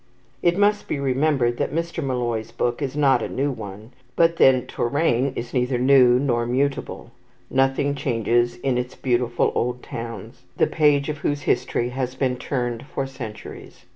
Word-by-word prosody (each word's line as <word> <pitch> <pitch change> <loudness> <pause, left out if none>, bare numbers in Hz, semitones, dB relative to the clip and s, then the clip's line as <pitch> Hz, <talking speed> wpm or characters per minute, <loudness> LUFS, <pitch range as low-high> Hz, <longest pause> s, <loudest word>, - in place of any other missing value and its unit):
It 175 0 +2
must 205 +1 +2
be 145 - -2
remembered 135 -2 +1
that 140 - -2
Mr. 170 -1 -2
Molloy's 120 -4 -2
book 120 +3 -2
is 140 0 -3
not 140 -3 +4
a - - -3
new 140 +2 -1
one; 105 -1 -9 0.2
but 165 0 +3
then 130 -2 +5
Touraine 135 0 0
is 120 0 -6
neither 125 0 +1
new 125 -1 +5
nor 120 -3 0
mutable. 135 -1 -2 0.4
Nothing 135 +2 +2
changes 120 -3 0
in 130 -2 +1
its 125 +1 -5
beautiful 120 -2 0
old 125 +1 -2
towns, 115 -2 -7 0.2
the - - +4
page 145 -3 +2
of 150 -1 -4
whose 145 -1 -2
history 120 - 0
has 130 0 -3
been 130 -2 0
turned 120 -3 -3
for 135 - -3
centuries. 130 -5 -9
130 Hz, 165 wpm, -23 LUFS, 120-140 Hz, 0.4 s, then